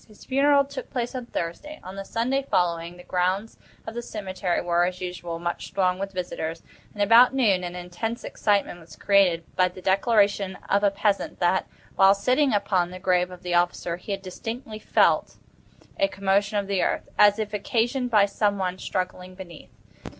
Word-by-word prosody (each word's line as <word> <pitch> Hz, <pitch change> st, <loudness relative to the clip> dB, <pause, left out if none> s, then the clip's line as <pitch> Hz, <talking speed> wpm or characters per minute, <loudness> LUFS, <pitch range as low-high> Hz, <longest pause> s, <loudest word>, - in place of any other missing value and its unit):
His 215 Hz, -2 st, -17 dB
funeral 280 Hz, +1 st, +3 dB
took 280 Hz, -, -8 dB
place 245 Hz, -1 st, -3 dB
on 250 Hz, -2 st, -6 dB
Thursday. 295 Hz, -, -5 dB
On 185 Hz, +1 st, -9 dB
the 195 Hz, -, -5 dB
Sunday 245 Hz, +7 st, -1 dB
following, 170 Hz, 0 st, 0 dB
the 180 Hz, -, -12 dB
grounds 185 Hz, +5 st, -1 dB, 0.3 s
of 225 Hz, -, -6 dB
the 240 Hz, -, -4 dB
cemetery 190 Hz, -5 st, -3 dB
were, 175 Hz, 0 st, +1 dB
as 180 Hz, 0 st, -4 dB
usual, 175 Hz, -2 st, -5 dB
much 175 Hz, +1 st, -5 dB
thronged 185 Hz, -1 st, +1 dB
with 195 Hz, 0 st, -4 dB
visitors, 175 Hz, -3 st, -4 dB, 0.3 s
and 205 Hz, -, +1 dB
about 235 Hz, +5 st, +6 dB
noon 205 Hz, -9 st, +3 dB
an 175 Hz, 0 st, -5 dB
intense 180 Hz, +6 st, -5 dB
excitement 200 Hz, -4 st, 0 dB
was 165 Hz, -2 st, -14 dB
created 190 Hz, -5 st, +3 dB
by 185 Hz, -1 st, +4 dB
the 180 Hz, +1 st, -10 dB
declaration 200 Hz, 0 st, +2 dB
of 200 Hz, +1 st, +2 dB
a 205 Hz, -, +5 dB
peasant 200 Hz, 0 st, -1 dB
that, 180 Hz, +1 st, +1 dB, 0.3 s
while 195 Hz, +1 st, +6 dB
sitting 255 Hz, +7 st, +2 dB
upon 190 Hz, -4 st, +1 dB
the 185 Hz, -, -8 dB
grave 180 Hz, -1 st, +1 dB
of 180 Hz, -1 st, -12 dB
the 180 Hz, -1 st, -3 dB
officer, 175 Hz, 0 st, 0 dB
he 180 Hz, -, -8 dB
had 195 Hz, 0 st, -3 dB
distinctly 220 Hz, +4 st, -6 dB
felt -, -, +2 dB, 0.6 s
a 295 Hz, -, +4 dB
commotion 200 Hz, 0 st, 0 dB
of 200 Hz, -, 0 dB
the 195 Hz, -2 st, 0 dB
earth, -, -, -1 dB
as 205 Hz, 0 st, +6 dB
if 215 Hz, -1 st, -4 dB
occasioned 240 Hz, +4 st, 0 dB
by 210 Hz, -4 st, +5 dB
some 205 Hz, 0 st, 0 dB
one 185 Hz, -1 st, -2 dB
struggling 185 Hz, 0 st, -4 dB
beneath. 175 Hz, -4 st, -11 dB
195 Hz, 185 wpm, -25 LUFS, 180-215 Hz, 0.6 s, about